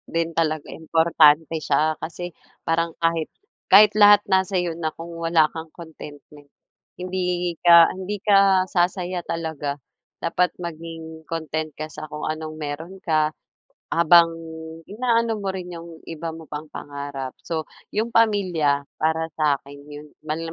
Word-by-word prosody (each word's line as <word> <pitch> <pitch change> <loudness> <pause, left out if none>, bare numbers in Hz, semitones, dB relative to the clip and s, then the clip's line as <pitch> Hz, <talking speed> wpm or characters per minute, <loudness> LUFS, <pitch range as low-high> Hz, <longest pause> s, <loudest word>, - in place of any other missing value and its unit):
din 165 0 +1
talaga 155 -2 0 0.2
importante 160 -1 +4
siya 140 0 +2 0.2
kasi 175 +1 -6 0.3
parang 165 0 +1
kahit 165 -1 +1 0.4
kahit 210 0 +9
lahat 205 0 +8
nasa 190 0 +3
sa'yo 175 -1 0
na 155 - 0
kung 170 +1 -8
wala 165 -1 +5
kang 160 0 -7
contentment, 145 -3 -12 0.5
hindi 185 0 -2 0.4
ka 170 - +9 0.2
hindi 190 +2 -4
ka, 200 -1 +6 0.4
sasaya 180 0 0
talaga. 160 -4 -3 0.5
Dapat 180 +2 +1
maging 160 -1 -8
content 155 -1 -3
ka 155 - -4
sa 155 0 -9
kung 150 0 -5
anong 155 0 -4
meron 155 +5 -6
ka, 155 -2 +2 0.6
habang 170 0 +6 0.6
inaano 230 -2 +1
mo 195 - -2
rin 180 -2 -5
'yung 170 0 -9 0.2
iba 165 0 -5
mo 160 0 -9
pang 150 +1 -7
pangarap. 140 -3 -6
So, 160 -3 -3 0.2
'yung 225 +3 -2
pamilya 175 -11 +2 0.2
para 160 +1 +1
sa 150 -3 +2
akin 140 +1 -14
'yung 150 +1 -10 0.2
ma 155 +1 -2
na 165 - -5
165 Hz, 145 wpm, -23 LUFS, 155-175 Hz, 0.6 s, kahit